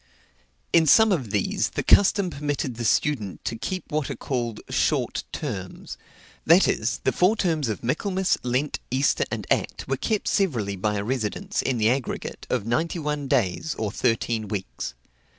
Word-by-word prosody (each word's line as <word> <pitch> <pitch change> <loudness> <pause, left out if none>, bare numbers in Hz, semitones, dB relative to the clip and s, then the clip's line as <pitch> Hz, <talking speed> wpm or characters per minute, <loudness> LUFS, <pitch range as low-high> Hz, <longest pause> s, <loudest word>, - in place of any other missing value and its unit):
In 165 -2 +5
some 220 +8 +7
of 135 - 0
these 100 -1 0
the - - -1
custom 200 -2 +4
permitted 145 -3 -2
the 120 0 -5
student 110 -5 0
to - - -2
keep 185 +10 -5
what 150 -2 -1
are - - -3
called 120 -5 -3
"short - - 0
terms;" 100 -11 -5 0.5
that 170 +4 +6
is, 110 +4 0
the - - +2
four 185 +5 +3
terms 160 - 0
of 110 - -4
Michaelmas, 185 - 0
Lent, 130 +4 -1
Easter, 135 +2 +2
and - - -4
Act, - - 0
were 135 - 0
kept 215 - -1
severally 120 - +1
by 105 +2 -1
a 100 - -1
residence, 130 - -2
in 130 -2 0
the 110 +1 +3
aggregate, 130 -1 -4
of - - 0
ninety 160 +10 0
one 150 -3 -2
days, 130 - 0
or 110 -2 -2
thirteen 115 -2 0
weeks. 95 -10 -5
130 Hz, 170 wpm, -25 LUFS, 110-160 Hz, 0.5 s, some